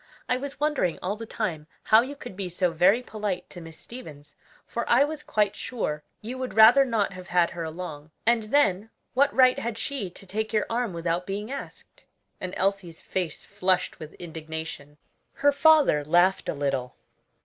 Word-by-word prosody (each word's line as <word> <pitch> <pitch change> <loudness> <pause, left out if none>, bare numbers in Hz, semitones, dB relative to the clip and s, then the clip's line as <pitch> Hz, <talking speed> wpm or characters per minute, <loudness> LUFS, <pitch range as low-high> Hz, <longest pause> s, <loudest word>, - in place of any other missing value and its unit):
"I 250 - +2
was 275 +2 -6
wondering 295 - +1
all 190 +3 -1
the 225 +1 -8
time 170 -10 -3 0.2
how 220 +1 +6
you 270 +4 -5
could 280 - -9
be 190 -1 -4
so 180 0 0
very 190 +9 +4
polite 205 -6 -4
to 175 - -9
Miss 165 -1 -10
Stevens; 150 - -11 0.3
for 235 - -3
I 250 +4 +6
was 300 +1 -3
quite 210 -7 0
sure 155 -12 -3 0.2
you 245 +4 -6
would 255 -3 -4
rather 230 +5 +8
not 225 -7 0
have 185 0 -10
had 175 -1 +2
her 170 -1 -5
along. 160 -2 -7 0.2
And 235 0 +4
then, 215 -5 +2 0.2
what 280 +3 +4
right 255 -1 +5
had 230 -1 -3
she 225 -5 -3
to 185 - -11
take 220 +3 -3
your 215 - +2
arm 235 -2 0
without 170 +1 -2
being 205 +4 -4
asked?" 280 - -9 0.3
and 185 0 -5
Elsie's 190 -4 -1
face 180 -5 -4
flushed 185 -2 0
with 155 -1 -9
indignation. 160 -3 -7 0.4
Her 285 0 +3
father 285 - +5
laughed 175 +5 +3
a - - -1
little. 135 -3 -2
195 Hz, 180 wpm, -26 LUFS, 170-235 Hz, 0.4 s, rather